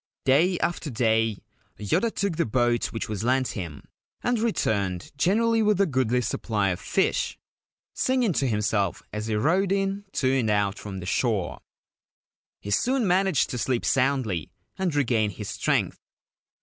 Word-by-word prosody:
Day 165 +7 +4
after 170 -2 -1
day 115 -4 +1 0.3
Yoda 105 - +1
took 200 -6 -2
the 170 - +2
boat 120 +1 +1
which 115 - -4
was 105 -1 -4
lent 130 +2 +2
him, 85 -8 -6 0.4
and 245 -1 +1
returned 100 - -1
generally 225 +9 +2
with 210 -2 +2
a 200 - +5
goodly 130 - +1
supply 105 -4 -1
of 90 - -2
fish, - - 0 0.6
singing 255 -6 +1
to 135 - +1
himself 105 -4 0
as 105 +1 -3
he 110 - 0
rowed 175 - +2
in 195 +1 0
to 130 0 +2
and 115 -3 0
out 105 -1 +1
from 95 -3 -6
the - - -7
shore. 105 -2 0 1.0
He 100 - -7
soon 250 - +2
managed 190 -4 +2
to 125 - -3
sleep 120 +2 0
soundly 125 - +1 0.3
and 180 -5 -1
regain 115 -7 +2
his 95 - -7
strength. - - 0
125 Hz, 155 wpm, -26 LUFS, -, 1.0 s, a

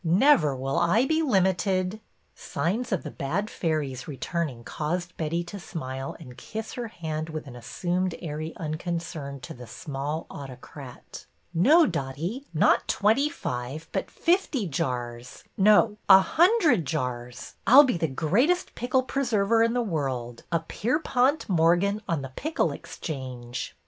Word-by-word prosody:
Never 170 - +4
will 135 +1 -1
I 180 +9 +3
be 315 +3 +2
limited 190 - +1
— - - -43
" - - -42
Signs 225 +9 -2
of 190 - 0
the 150 - -6
bad 190 +10 -2
fairies 145 -6 -2
returning 145 -3 -3
caused 175 +7 -3
Betty 165 +2 -1
to 185 +4 -8
smile 135 -6 -5
and 125 -1 -11
kiss 220 +1 -6
her 240 -2 -4
hand 160 -5 -5
with 155 -1 -5
assumed 175 +8 -2
airy 155 0 -5
un 155 -2 -3
concern 165 -5 -4
to 125 - -8
the 125 -1 -11
small 145 +6 -4
autocrat. 135 -1 -10 0.3
No, 295 - +6
Dotty, 165 - -3
not 160 - +3
twenty 225 +9 +3
five, 135 - -5
but - - -2
fifty 335 - +1
jars, 125 -4 -4
— - - -43
no, 210 +1 +4
a 190 - +11
hundred 320 - +4
jars! 125 -5 -4
I 245 - +6
'll 290 - +12
be 250 -10 +1
the 160 - +1
greatest 220 - +1
pickle 255 +1 +1
preserver 230 -5 +1
in 230 0 +3
the 245 - +2
world, 130 - -3
a 165 -1 +1
Pierpont 255 - 0
Morgan 180 +3 +3
on 160 -5 0
the 130 -1 -8
Pickle 315 +3 0
Exchange 130 -5 -6
170 Hz, 150 wpm, -26 LUFS, 140-220 Hz, 0.3 s, ll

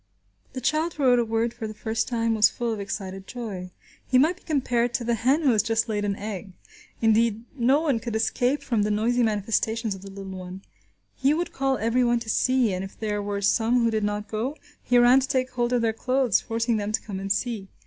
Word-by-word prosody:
The 255 - -5
child 310 +6 0
who 290 - -3
wrote 250 -2 +5
a - - +3
word 225 +1 -1
for 230 -2 -5
the 215 - -8
first 220 +1 -2
time 230 -2 0
was 215 -2 +5
full 235 -1 -2
of 215 - -5
excited 195 -1 -5
joy. 205 -7 -6 0.4
He 255 - +3
might 315 +7 +3
be - - -21
compared 245 -5 0
to 240 - -1
the 235 0 0
hen 260 +8 +2
who 275 - +5
has 215 -3 +3
just 225 +2 0
laid 210 -2 -1
an 200 -1 -1
egg. 200 -2 -6 0.5
Indeed, 225 0 +3
no 265 +3 +3
one 285 -8 +1
could 230 -1 -5
escape 245 +5 0
from 230 -4 0
the 210 - +1
noisy 225 +4 +1
manifestations 220 0 0
of 190 - -10
the 195 - -10
little 195 0 -8
one. 185 +1 -8 0.5
He 275 +3 +2
would 340 +1 -3
call 270 -2 0
everyone 240 +2 +2
to 225 - -7
see, 255 -5 +2
and 185 +1 -3
if 195 - -10
there 210 -2 -2
were 200 0 -3
some 230 +4 +3
who 230 - +2
did 215 -1 0
not 210 0 -2
go, 235 +8 -3 0.2
he 245 - +2
ran 245 +2 +6
to 265 - -2
take 260 -2 0
hold 240 -1 -1
of 245 -2 +1
their 225 -1 +1
clothes 255 -2 +1
forcing 230 0 -1
them 205 0 -2
to - - +1
come 195 -3 -6
and 195 0 -3
see. 210 -1 -1
230 Hz, 235 wpm, -25 LUFS, 210-250 Hz, 0.5 s, ran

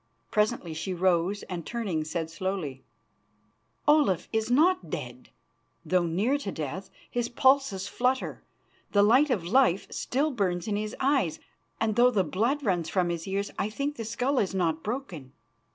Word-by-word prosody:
Presently 210 -5 0
she 180 +4 -3
rose, 185 +2 +1
and, 175 -2 -5
turning, 195 -7 -2
said 160 +1 -3
slowly: 165 -7 -4 1.0
"Olaf 295 - +4
is 220 0 0
not 350 +9 +3
dead, - - -6 0.6
though 180 -2 +2
near 215 - +1
to 205 -9 -4
death. 160 +5 -5 0.2
His 240 -1 -1
pulses 260 -7 +2
flutter, 255 +4 -1 0.5
the 205 -1 +5
light 255 +8 +5
of 215 -9 0
life 200 -2 +3
still 290 +5 0
burns 185 -7 -1
in 210 - 0
his 210 +1 -3
eyes, 265 - +1 0.4
and 220 -2 0
though 245 +2 +6
the 210 -6 +2
blood 230 - 0
runs 180 -7 0
from 180 -2 +1
his 170 0 -3
ears, 200 +1 -2
I 205 - 0
think 280 +6 -3
the 230 - -5
skull 250 +5 0
is 195 -1 -1
not 165 -3 0
broken." 185 - -5
205 Hz, 160 wpm, -28 LUFS, 175-250 Hz, 1.0 s, though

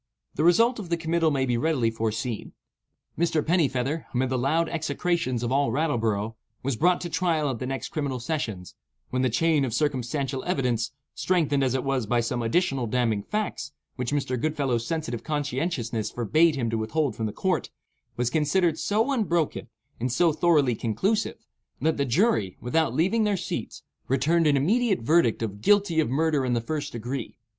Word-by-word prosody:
The 150 - -1
result 230 +8 +4
of 190 -5 -7
the 170 - +1
committal 165 0 +1
may 135 -3 +1
be 120 -2 0
readily 130 -6 +1
foreseen. 110 0 -3 0.6
Mr. 160 -2 +1
Pennifeather, 150 -3 0
amid 130 +1 +1
the 130 - +1
loud 160 +6 +1
execrations 160 -5 -1
of 120 - -1
all 140 -3 +2
Rattleborough, 115 -7 0 0.3
was 135 -1 0
brought 175 +8 +2
to 175 - -3
trial 165 -5 +1
at 120 - -5
the 125 - -3
next 135 0 -4
criminal 140 -4 -2
sessions, 115 - -4 0.4
when 130 - 0
the 130 - +2
chain 155 +4 +2
of 120 -4 -1
circumstantial 135 -1 -1
evidence 125 -9 0 0.2
(strengthened 150 -6 +1
as 130 -1 +1
it 130 - -1
was 135 -5 -1
by 120 +2 +2
some 120 +1 -1
additional 130 0 +1
damning 115 -3 +1
facts, 210 - -3 0.2
which 125 0 -3
Mr. 130 -4 -1
Goodfellow's 135 -7 0
sensitive 155 -8 -3
conscientiousness 140 -6 -2
forbade 155 +8 +2
him 120 -5 -1
to 115 - -1
withhold 130 +3 -1
from 110 - -2
the - - -4
court) - - -1 0.5
was 120 0 0
considered 160 +3 +2
so 220 +6 +1
unbroken 175 - 0 0.3
and 125 +2 -1
so 165 +5 +3
thoroughly 150 -6 +3
conclusive, 155 - -1 0.3
that 160 0 +1
the 140 - +1
jury, 135 - +1
without 125 +1 0
leaving 190 +9 +2
their 205 -2 +1
seats, - - -5 0.2
returned 155 +5 +2
an 145 -1 +4
immediate 205 - +2
verdict 120 -3 +3
of 105 -2 -5
"Guilty 200 - +3
of 155 - +2
murder 150 +1 +1
in 125 -1 0
the 120 - +2
first 145 +4 -4
degree." 120 +2 -5
140 Hz, 175 wpm, -26 LUFS, 120-165 Hz, 0.6 s, result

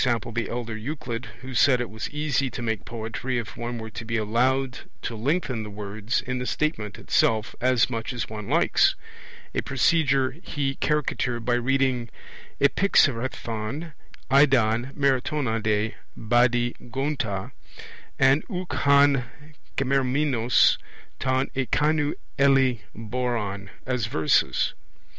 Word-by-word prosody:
the 115 -2 0
elder 120 -2 -4
Euclid, 120 0 -5
who 130 0 -8
said 125 0 +4
it 125 - -2
was 110 0 -6
easy 145 -3 0
to 120 - -6
make 110 -3 -2
poetry 115 +3 -4
if 110 -3 -5
one 120 0 -4
were 110 -1 -7
to 115 - -6
be 115 0 -2
allowed 125 +4 +1 0.2
to 115 - -3
lengthen 130 0 -1
the 105 - -6
words 105 +2 -3
in 125 0 -3
the 125 - -3
statement 110 -10 -2
itself 110 0 +1
as 125 -1 +3
much 115 -1 -4
as 120 -2 -3
one 105 -2 -7
likes - - +3 0.6
a - - 0
procedure 135 -2 +2
he 140 -5 -2
caricatured 130 -5 -1
by 120 - +2
reading 125 -1 +1 0.5
'Epixarhon 130 - +1 0.4
eidon 130 -3 +4
Marathonade 115 -6 +1 0.2
Badi 120 +1 +2 0.2
gonta, 130 -6 -2 0.7
and 135 +3 +4
ouk 185 -3 -4
han 140 -2 +4 0.5
g' - - +2
eramenos 130 -2 +3 0.4
ton 130 +1 +1
ekeinou 150 +3 +1 0.2
helle 135 -3 +4 0.2
boron 110 -4 -3 0.2
as 125 -4 -1
verses. 80 -8 +2
125 Hz, 125 wpm, -25 LUFS, 115-135 Hz, 0.7 s, said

